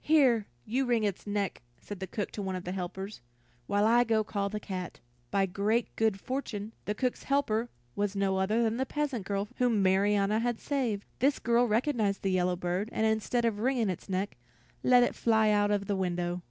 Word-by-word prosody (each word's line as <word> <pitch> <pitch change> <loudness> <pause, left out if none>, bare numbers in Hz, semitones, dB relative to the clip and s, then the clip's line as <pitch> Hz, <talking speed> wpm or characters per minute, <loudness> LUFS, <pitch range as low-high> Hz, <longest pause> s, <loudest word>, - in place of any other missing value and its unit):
"Here, 260 -9 +4 0.2
you 260 +4 0
wring 235 -3 +2
its 205 -1 -2
neck," 205 -6 -2 0.2
said 205 -2 -8
the 190 - -4
cook 205 - -3
to 210 - -5
one 190 -1 -3
of 185 - -6
her 180 - -3
helpers, 190 - -5 0.5
"while 205 +1 +2
I 240 +2 +5
go 220 -2 +2
call 200 -1 -2
the 210 +1 -4
cat." 185 -4 -6 0.3
By 195 +5 +2
great 205 +5 0
good 220 -3 +1
fortune, 220 -4 -4
the 210 - -1
cook's 250 +2 -2
helper 245 -5 +1 0.3
was 205 0 -1
no 195 -1 +1
other 215 +5 +2
than 225 0 0
the 265 - 0
peasant 280 -9 -2
girl 200 0 -1
whom 235 -5 +2
Marianna 200 +2 +3
had 240 0 -1
saved. 240 -8 -1
This 275 +3 +3
girl 240 +1 +2
recognized 220 -3 +1
the 195 - +1
yellow 180 -1 +2
bird, 180 +4 -2
and 220 - 0
instead 220 +2 +1
of 220 -3 0
wringing 240 -3 +1
its 180 - -8
neck, 190 -4 -2 0.4
let 250 -1 +6
it - - +1
fly 220 -2 +3
out 205 0 +3
of 205 -1 0
the 200 - -1
window. 175 -1 -1
210 Hz, 205 wpm, -30 LUFS, 195-235 Hz, 0.5 s, let